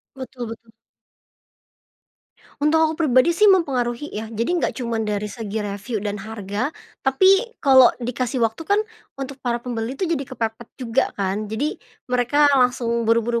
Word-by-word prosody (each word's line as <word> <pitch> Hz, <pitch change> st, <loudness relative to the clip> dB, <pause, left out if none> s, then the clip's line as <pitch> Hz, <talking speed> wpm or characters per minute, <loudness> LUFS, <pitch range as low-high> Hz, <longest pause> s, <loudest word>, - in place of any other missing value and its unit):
Betul 255 Hz, -3 st, -7 dB
betul. 225 Hz, 0 st, -11 dB, 1.9 s
Untuk 300 Hz, +2 st, +3 dB
aku 315 Hz, -, +1 dB
pribadi 270 Hz, +1 st, +4 dB
sih, 420 Hz, +5 st, +4 dB
mempengaruhi 275 Hz, -7 st, +1 dB
ya. 220 Hz, +1 st, -5 dB
Jadi 230 Hz, +4 st, -2 dB
enggak -, -, -1 dB
cuman 235 Hz, -3 st, -2 dB
dari 210 Hz, 0 st, -1 dB
segi 215 Hz, -1 st, -4 dB
review 205 Hz, +3 st, -4 dB
dan 205 Hz, 0 st, -3 dB
harga, 215 Hz, +3 st, -3 dB, 0.3 s
tapi 385 Hz, -, +3 dB
kalau 260 Hz, -3 st, +7 dB, 0.2 s
dikasih 250 Hz, +1 st, -2 dB
waktu 225 Hz, -, -3 dB
kan, 405 Hz, -, +4 dB, 0.4 s
untuk 270 Hz, 0 st, -7 dB
para 240 Hz, -2 st, -1 dB
pembeli 240 Hz, +1 st, -3 dB
tuh, 375 Hz, -, -1 dB
jadi 310 Hz, -6 st, -2 dB
kepepet 230 Hz, -2 st, -4 dB
juga 250 Hz, 0 st, 0 dB
kan. 200 Hz, +2 st, -2 dB
Jadi, 275 Hz, +8 st, -3 dB, 0.2 s
mereka 255 Hz, +4 st, +3 dB
langsung 235 Hz, -2 st, +1 dB
buru-buru 230 Hz, +1 st, +2 dB
245 Hz, 150 wpm, -22 LUFS, 225-275 Hz, 1.9 s, kalau